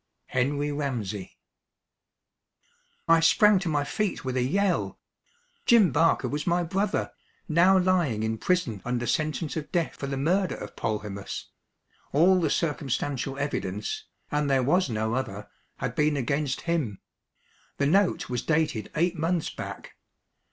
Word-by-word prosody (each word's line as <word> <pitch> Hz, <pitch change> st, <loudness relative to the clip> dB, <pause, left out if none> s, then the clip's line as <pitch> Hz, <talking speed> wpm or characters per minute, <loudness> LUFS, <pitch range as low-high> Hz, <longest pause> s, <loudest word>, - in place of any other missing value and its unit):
HENRY 145 Hz, +3 st, 0 dB
RAMSEY. 115 Hz, -10 st, -4 dB, 1.7 s
I 165 Hz, 0 st, +6 dB
sprang 200 Hz, +5 st, +5 dB
to 180 Hz, -2 st, -2 dB
my 145 Hz, -2 st, +1 dB
feet 205 Hz, +1 st, -2 dB
with 130 Hz, 0 st, -2 dB
a 130 Hz, -, +2 dB
yell. 190 Hz, +9 st, 0 dB, 0.7 s
Jim 220 Hz, -9 st, +6 dB
Barker 165 Hz, +5 st, +3 dB
was 150 Hz, +3 st, -3 dB
my 175 Hz, 0 st, +2 dB
brother, 195 Hz, +4 st, -1 dB, 0.4 s
now 180 Hz, +4 st, +5 dB
lying 175 Hz, -, +2 dB
in 110 Hz, 0 st, -2 dB
prison 125 Hz, -, 0 dB
under 120 Hz, 0 st, -2 dB
sentence 155 Hz, +5 st, -1 dB
of 155 Hz, -2 st, -5 dB
death 170 Hz, -3 st, 0 dB
for 140 Hz, -, -5 dB
the 135 Hz, 0 st, -3 dB
murder 180 Hz, +7 st, +1 dB
of -, -, -9 dB
Polhemus; 105 Hz, -2 st, -4 dB, 0.6 s
all 180 Hz, +5 st, +5 dB
the 160 Hz, -, +1 dB
circumstantial 140 Hz, -3 st, -1 dB
evidence, 105 Hz, -8 st, -3 dB, 0.3 s
and 150 Hz, -1 st, 0 dB
there 135 Hz, -2 st, +3 dB
was 175 Hz, +4 st, +2 dB
no 110 Hz, 0 st, -1 dB
other, 105 Hz, -5 st, -3 dB, 0.3 s
had -, -, -3 dB
been 150 Hz, -1 st, +2 dB
against 140 Hz, +1 st, -1 dB
him. 155 Hz, -, -1 dB, 0.8 s
The 140 Hz, -, +1 dB
note 185 Hz, +5 st, +2 dB
was 125 Hz, -1 st, -2 dB
dated 150 Hz, -9 st, 0 dB
eight 175 Hz, +3 st, +1 dB
months 165 Hz, +1 st, -1 dB
back. -, -, -8 dB
150 Hz, 140 wpm, -27 LUFS, 125-170 Hz, 1.7 s, I